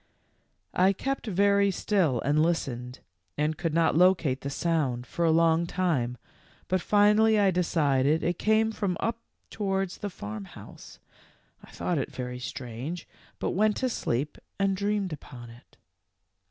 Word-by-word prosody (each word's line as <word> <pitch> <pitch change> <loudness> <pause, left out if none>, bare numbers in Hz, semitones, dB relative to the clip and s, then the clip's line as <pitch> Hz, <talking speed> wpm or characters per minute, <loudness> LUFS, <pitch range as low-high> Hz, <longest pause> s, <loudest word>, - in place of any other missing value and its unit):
"I 190 +2 +4
kept 270 +5 -3
very 200 0 +3
still 180 - +1
and 145 +2 +2
listened, 125 -7 -2 0.4
and 150 +1 0
could 165 +1 -2
not 165 0 +2
locate 170 -6 +3
the 140 - -4
sound 140 -6 -1
for 170 - -3
a 165 - +4
long 165 +1 +3
time, 145 -11 -1 0.5
but 185 -1 0
finally 210 +2 +4
I 200 -2 +4
decided 155 -4 +1
it 175 0 -1
came 220 +1 +3
from 195 -5 -2
up 230 0 -1 0.3
towards 195 -3 -2
the 205 - -3
farm 105 - -7
house. - - -13 0.7
I - - -15
thought 175 -4 -2
it - - -3
very 125 -1 -5
strange, 130 +6 -6 0.3
but - - -2
went 210 +2 +2
to 260 - 0
sleep 145 - -2 0.2
and 195 -1 +2
dreamed 200 -2 -1
upon 120 -5 -10
it. 120 +2 -18
170 Hz, 150 wpm, -27 LUFS, 135-200 Hz, 0.7 s, I